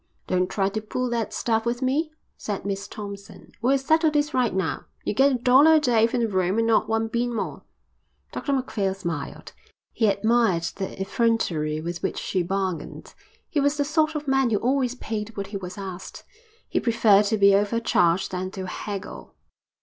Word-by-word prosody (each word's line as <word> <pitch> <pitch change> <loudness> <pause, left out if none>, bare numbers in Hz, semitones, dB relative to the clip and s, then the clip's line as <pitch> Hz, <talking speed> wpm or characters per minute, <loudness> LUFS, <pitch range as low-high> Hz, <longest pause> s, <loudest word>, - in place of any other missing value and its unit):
"Don't 180 0 0
try 195 -1 0
to 210 +2 -3
pull 250 +3 -3
that 230 -2 -1
stuff 225 -1 0
with 240 +2 -2
me," 300 +5 0 0.2
said 205 -2 -5
Miss 200 0 -3
Thompson. 200 -1 -9
"We'll 265 +4 +3
settle 315 +4 +3
this 300 0 0
right 250 -2 +2
now. 185 -3 -2 0.2
You - - -1
get 270 +6 +4
a - - +1
dollar 265 +6 +6
a - - +6
day 235 -6 +3
for 235 - -2
the 235 -1 +1
room 185 -1 0
and 230 - +2
not 225 -1 +2
one 225 0 +1
bean 240 +2 -1
more." - - -4 0.7
Dr 285 - -3
Macphail 215 -7 -1
smiled. 170 -7 -6 0.4
He 225 - +2
admired 210 -3 +2
the 190 -1 -5
effrontery 190 -8 0
with 170 +1 -5
which - - -2
she 185 - -1
bargained. 190 -1 -3 0.3
He 300 - -1
was 285 +1 +2
the 285 - +1
sort 310 +1 +1
of 300 -1 -4
man 270 -2 +3
who 215 - +2
always 255 +2 0
paid 220 -3 -5
what 200 - -2
he - - -1
was 180 -1 -8
asked. 190 -2 -7 0.4
He - - 0
preferred 220 -4 +4
to 220 +2 +1
be 200 -1 +6
over 205 +3 +2
charged 175 -5 +2
than 185 0 -3
to 190 - -4
haggle. 200 +1 -7
220 Hz, 190 wpm, -24 LUFS, 195-250 Hz, 0.7 s, dollar